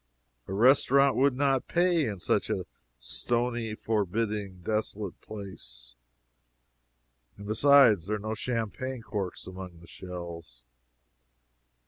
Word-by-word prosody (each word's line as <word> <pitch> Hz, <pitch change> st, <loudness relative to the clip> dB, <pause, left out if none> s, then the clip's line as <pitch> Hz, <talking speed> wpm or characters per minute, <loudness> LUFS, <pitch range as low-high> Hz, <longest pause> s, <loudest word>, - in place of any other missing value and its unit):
A 95 Hz, -, -5 dB
restaurant 135 Hz, +4 st, +5 dB
would 135 Hz, 0 st, +3 dB
not 135 Hz, -1 st, +1 dB
pay 175 Hz, -3 st, +2 dB
in 100 Hz, -3 st, -4 dB
such -, -, 0 dB
a -, -, -1 dB, 0.3 s
stony, 120 Hz, -, -2 dB
forbidding, 105 Hz, -2 st, -2 dB
desolate 105 Hz, -2 st, -3 dB
place. 60 Hz, -, -9 dB, 1.4 s
And 100 Hz, -, -10 dB
besides, 115 Hz, -, +5 dB
there 105 Hz, +1 st, 0 dB
were 110 Hz, +2 st, -5 dB
no -, -, 0 dB
champagne 120 Hz, +2 st, -3 dB
corks 100 Hz, -6 st, -4 dB
among 95 Hz, -2 st, -9 dB
the 85 Hz, -, -15 dB
shells. 85 Hz, -9 st, -9 dB
105 Hz, 110 wpm, -28 LUFS, 95-125 Hz, 1.4 s, restaurant